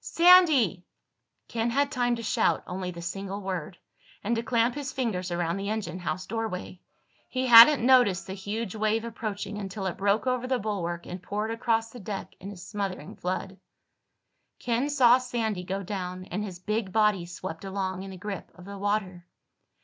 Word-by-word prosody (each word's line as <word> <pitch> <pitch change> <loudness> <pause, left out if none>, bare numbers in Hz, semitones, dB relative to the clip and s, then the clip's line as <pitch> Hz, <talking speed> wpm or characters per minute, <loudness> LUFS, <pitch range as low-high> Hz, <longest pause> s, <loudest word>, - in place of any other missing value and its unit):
"Sandy!" 320 - +5 0.6
Ken 230 0 -1
had 280 +4 +1
time 245 -3 +1
to 230 - -7
shout 215 - +1
only 180 0 -4
the 170 -1 -7
single 195 +3 -4
word, 185 -3 -5 0.5
and 230 +4 0
to 230 - 0
clamp 235 0 +1
his 285 -1 -5
fingers 205 -8 -2
around 175 0 -1
the 200 +1 -3
engine 195 -5 -3
house 185 +1 -3
doorway. 210 -5 -4 0.5
He 260 0 -1
hadn't 240 +2 +9
noticed 235 -9 +5
the 190 - -6
huge 205 +2 -4
wave 220 +1 0
approaching 210 -3 -5
until 195 0 -5
it 185 - -3
broke 200 +4 +1
over 255 -1 0
the 255 0 +1
bulwark 175 -6 -3
and 180 0 -7
poured 210 +4 -3
across 225 -1 0
the 245 - -10
deck 200 -1 -6
in 195 - -8
a 200 - -10
smothering 190 -3 -5
flood. 185 +1 -4 1.0
Ken 245 +4 -1
saw 255 -4 +6
Sandy 225 -6 -2
go 195 +2 -3
down 185 -2 -5
and 205 +4 -2
his 190 -4 -6
big 210 +2 -2
body 210 -4 +2
swept 175 -1 -7
along 190 -1 -3
in 195 - -7
the 190 - -9
grip 195 0 -6
of 180 0 -13
the 200 0 -8
water. 195 -4 -2
205 Hz, 180 wpm, -27 LUFS, 185-230 Hz, 1.0 s, hadn't